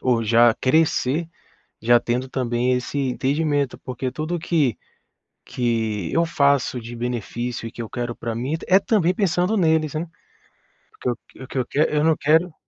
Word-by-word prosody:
ou 120 -3 +2
já 115 +1 +5
crescer, 155 +2 +1 0.5
já 120 +2 +5
tendo 125 +3 -2
também 125 -1 0
esse 125 +3 -3
entendimento, 140 +1 0
porque 130 0 -4
tudo 155 +6 -3
que 155 - +1 0.7
que 110 -6 -1
eu 165 +1 +3
faço 140 -5 +1
de 115 +1 -8
benefício 120 0 -4
e 115 - -7
que 120 - -6
eu 110 - -8
quero 120 -1 -3
pra 115 - -4
mim 125 +6 -2
é - - +1
t - - -11
é 190 - +7
também 195 -4 +2
pensando 180 +1 +1
neles, 160 -5 +2
né. 160 +2 -3 0.9
O - - -49
que - - -2 0.3
eu 130 - -8
o - - -9
que 130 - -5
eu 125 - 0
quer 150 +4 +1
eu 150 - +2
não 160 0 +3
quero 160 +3 +2
130 Hz, 185 wpm, -22 LUFS, 120-160 Hz, 0.9 s, é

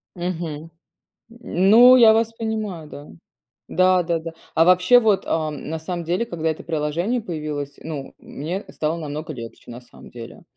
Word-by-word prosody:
Мгм. 175 -1 -3 0.9
М, 195 -5 -1
ну, 245 +4 +8
я 230 -3 +7
вас 225 0 +1
понимаю, 215 -8 -4
да. 145 0 -11 0.6
Да-да-да. 175 -2 +1 0.2
А 165 - +4
вообще 185 +7 +5
вот, 215 -4 +2
ам, 155 -3 -3
на 160 +1 -4
самом 170 +1 -5
деле, 180 +7 -1
когда 165 -7 -3
это 160 - -6
приложение 165 +9 -2
появилось, 150 -7 -5
ну, 150 -4 -7
мне 175 +8 -6
стало 155 +2 -2
намного 155 0 -6
легче, 120 -2 -10
на 120 - -9
самом 125 - -16
деле. 115 -1 -11
170 Hz, 155 wpm, -22 LUFS, 150-200 Hz, 0.9 s, ну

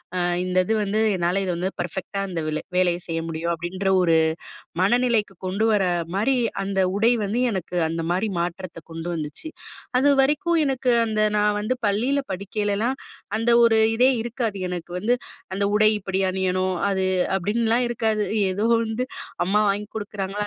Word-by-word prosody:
அ - - 0 0.2
இந்த 185 0 -2
இது 220 - 0
வந்து 210 +1 0 0.2
என்னால 175 +2 0
இது 185 - -1
வந்து 180 +2 -1
பெர்ஃபெக்ட்டா 185 +3 -4
இந்த 170 -3 -3
வெலு 155 0 -2
வேலைய 180 -1 +2
செய்ய 165 0 -2
முடியும், 165 +1 -3
அப்பிடின்ற 180 +4 -4
ஒரு 165 -2 +3 0.7
மனநிலைக்கு 225 -1 +2
கொண்டு 200 +4 0
வர 205 -3 +3 0.3
மாரி, 230 +7 +2 0.3
அந்த 195 0 -1 0.2
உடை 225 +3 +4
வந்து 210 +5 -1
எனக்கு 180 -3 -4
அந்த 165 0 -3
மாரி 190 +5 0
மாற்றத்த 170 0 -4
கொண்டு 165 +1 -6
வந்துச்சு. 155 - -6 0.5
அது 285 +2 +4
வரைக்கும் 300 +5 +2
எனக்கு 260 -3 +1
அந்த 215 -1 0
நான் 210 0 +2
வந்து 255 +5 -1
பள்ளியில 245 +8 +1
படிக்கையிலெல்லாம் 205 +5 -1 0.4
அந்த 230 +1 +1
ஒரு 225 -1 +4 0.2
இதே 250 +3 +5
இருக்காது. 230 -3 -3
எனக்கு 175 -1 -6
வந்து, 235 +6 +1 0.4
"அந்த 200 +1 0
உடை 215 0 +5
இப்பிடி 190 -1 -2
அணியணும், 185 0 0
அது" 190 -1 0 0.3
அப்பிடின்லாம் 230 +5 +1
இருக்காது. 220 -2 0 0.3
ஏதோ 210 +4 0 0.2
வந்து, 225 +3 -2 0.4
"அம்மா 210 +2 +3
வாங்கி 205 +1 -3
குடுக்கறாங்களா! 205 -1 -4
200 Hz, 160 wpm, -23 LUFS, 185-225 Hz, 0.7 s, இதே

